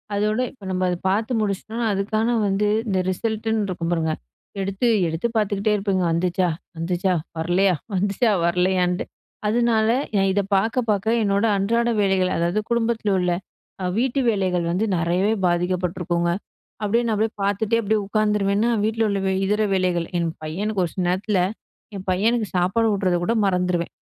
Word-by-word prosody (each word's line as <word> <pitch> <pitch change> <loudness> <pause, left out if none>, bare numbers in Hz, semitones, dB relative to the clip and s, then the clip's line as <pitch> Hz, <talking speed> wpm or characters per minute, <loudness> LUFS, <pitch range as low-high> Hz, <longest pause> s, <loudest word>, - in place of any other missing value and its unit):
அதோட 210 +2 +1
இப்ப 245 -7 -20
நம்ம 185 0 -1
அத 180 - 0
பார்த்து 220 +6 0
முடிச்சிட்டோம்னா, 215 +3 -2
அதுக்கான 220 +4 0
வந்து 200 +2 +1 0.2
இந்த 190 -2 +1
ரிசல்ட்டுன்னு 220 +1 -1
இருக்கும் 170 -2 -3
பாருங்க 160 -2 0 0.5
எடுத்து 195 +5 -1 0.2
எடுத்து 165 +7 -1
பார்த்துக்கிட்டே 210 0 +1
இருப்பேங்க. 195 -2 0
வந்துச்சா? 180 +1 +1 0.3
வந்துச்சா? 180 +3 0 0.2
வரலையா? 180 +3 +2 0.2
வந்துச்சா? 205 +4 +1
வரலையான்ட்டு. 180 +1 +1 0.4
அதனால 225 0 +2 0.3
எ - - +3
இத 200 - +2
பார்க்க 220 +6 +2
பார்க்க 215 +2 +2
என்னோட 200 +1 +2
அன்றாட 230 +4 +1
வேலைகள். 190 -2 +2
அதாவது, 170 +4 +1
குடும்பத்தில் 230 -3 0
உள்ள 180 -1 +1 0.5
அ - - 0
வீட்டு 260 +3 +1
வேலைகள் 185 -5 +1
வந்து 190 +6 +1
நிறையவே 175 +5 +1
பாதிக்கப்பட்டிருக்குங்க. 175 -1 0 0.5
அப்டியே 220 +3 +2
நான் 225 - +1
அப்டியே 220 +1 0
பார்த்துட்டே 205 +3 +1
அப்டியே 215 +1 +1
உட்காந்துருவேன்னா. 210 +1 +1
வீட்ல 220 +1 +1
உள்ள 200 -1 0
வே 190 - +1
இதர 210 +2 +1
வேலைகள், 180 -3 0
என் 170 -1 0
பையனுக்கு 195 +6 -2
ஒரு 165 - -6
சில 185 - -2
நேரத்தில 190 +1 +1 0.5
என் 190 -1 -7
பையனுக்கு 220 +4 +1
சாப்பாடு 190 +6 +2
ஊட்டுறத 185 -3 +1
கூட 225 - +1
மறந்துருவேன். 180 -2 0
195 Hz, 150 wpm, -22 LUFS, 180-220 Hz, 0.5 s, எ